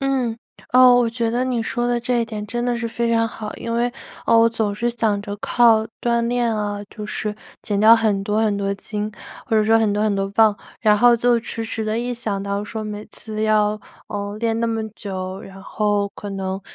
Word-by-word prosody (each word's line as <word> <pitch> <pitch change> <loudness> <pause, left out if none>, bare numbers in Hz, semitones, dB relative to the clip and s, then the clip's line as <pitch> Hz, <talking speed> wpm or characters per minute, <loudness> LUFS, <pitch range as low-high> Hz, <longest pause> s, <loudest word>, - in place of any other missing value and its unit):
嗯， 260 -4 0 0.3
哦， 255 0 +8
我 235 -2 +2
觉 230 -1 -1
得 245 +2 0
你 250 -3 -1
说 240 +2 -1
的 240 0 +1
这 245 0 0
一 230 - +1
点， 210 -2 -6
真 240 +3 -3
的 245 -1 0
是 235 0 -3
非 235 0 -1
常 230 0 +3
好。 215 -1 -7
因 230 - -5
为， 240 +1 +1 0.3
我 230 0 +6
总 220 -3 -1
是 235 +3 -1
想 220 -3 0
着， 205 -1 -5
靠 225 0 +4 0.2
锻 235 -1 +1
炼 240 -2 +1
啊 205 -1 -2
就 210 0 -8
是 210 0 -3 0.3
减 205 -1 -1
掉 225 +2 +8
很 210 -3 +1
多 210 +1 -1
很 210 -2 +1
多 200 0 -1
斤， 210 +1 -4 0.4
或 225 -4 +1
者 215 - +4
说 225 +1 +5
很 215 -2 +2
多 210 +1 0
很 210 -2 +2
多 195 0 -1
磅。 215 -1 +4 0.2
然 210 -2 +4
后 240 +1 +6
就 235 0 +2
迟 225 0 -5
迟 220 0 -3
地 215 +1 -1
一 245 +1 -2
想 210 -4 -3
到 200 0 -2
说， 215 +1 -5
每 210 0 -6
次 215 -1 -6
要， 215 -1 +2 0.3
呃， 205 0 -4
练 230 0 0
那 230 - +1
么 225 -1 -2
久， 190 -2 -6
然 195 0 -11
后 205 -1 0
可 205 - -7
能 190 0 -3
220 Hz, 240 characters per minute, -21 LUFS, 205-235 Hz, 0.4 s, 哦